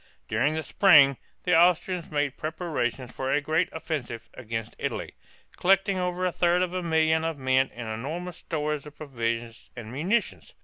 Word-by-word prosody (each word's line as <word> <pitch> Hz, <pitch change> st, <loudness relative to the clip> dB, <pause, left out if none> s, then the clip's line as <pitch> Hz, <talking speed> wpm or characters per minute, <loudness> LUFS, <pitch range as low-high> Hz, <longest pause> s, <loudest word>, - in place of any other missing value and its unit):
During 130 Hz, +8 st, +1 dB
the 160 Hz, -, -2 dB
spring 145 Hz, -10 st, +6 dB, 0.3 s
the 180 Hz, -2 st, +3 dB
Austrians 175 Hz, +1 st, +3 dB
made 145 Hz, -2 st, -1 dB
preparations 150 Hz, -7 st, -3 dB
for 130 Hz, +1 st, -3 dB
a 145 Hz, -, +3 dB
great 160 Hz, +4 st, 0 dB
offensive 145 Hz, -8 st, -5 dB
against 115 Hz, -2 st, -5 dB
Italy, -, -, -3 dB, 0.4 s
collecting 195 Hz, +1 st, +3 dB
over 180 Hz, 0 st, -1 dB
a 180 Hz, -, +1 dB
third 175 Hz, +1 st, +2 dB
of 180 Hz, -1 st, -3 dB
a 185 Hz, -, -1 dB
million 160 Hz, -1 st, +2 dB
of 165 Hz, -2 st, -2 dB
men 130 Hz, 0 st, +2 dB
and 115 Hz, -1 st, -7 dB
enormous 155 Hz, +11 st, -5 dB
stores 150 Hz, -2 st, -3 dB
of 150 Hz, -, -13 dB
provisions 115 Hz, -5 st, -4 dB
and 115 Hz, -3 st, -8 dB
munitions. 185 Hz, -, -1 dB
155 Hz, 165 wpm, -27 LUFS, 130-175 Hz, 0.4 s, spring